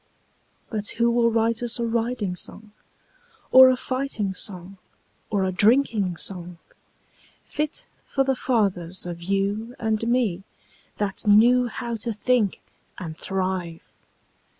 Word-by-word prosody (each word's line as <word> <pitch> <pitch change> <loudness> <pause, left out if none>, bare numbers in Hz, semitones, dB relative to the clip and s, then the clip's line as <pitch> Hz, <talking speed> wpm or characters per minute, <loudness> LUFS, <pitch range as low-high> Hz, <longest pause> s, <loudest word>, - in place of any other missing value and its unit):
But 210 -2 -2
who 235 0 +3
will 235 0 +3
write 230 0 +1
us 240 0 0
a 235 - -1
riding 230 -4 -1
song 210 +4 -9 0.8
Or 260 0 +10
a 255 - +3
fighting 255 -7 -2
song 185 0 -3 0.5
or 200 -3 0
a 190 - 0
drinking 210 -3 +2
song, 180 -2 -4 0.9
Fit 300 0 -3 0.2
for 270 - +1
the 270 0 +1
fathers 190 -9 -1
of 170 -1 -6
you 200 +6 -1
and 220 0 -1
me, 235 -7 +1 0.6
That 205 0 -3
knew 240 +4 +6
how 235 0 -4
to 225 +1 -4
think 215 -1 +1 0.4
and 165 -3 -6
thrive? 185 -2 -3
215 Hz, 125 wpm, -24 LUFS, 190-240 Hz, 0.9 s, Or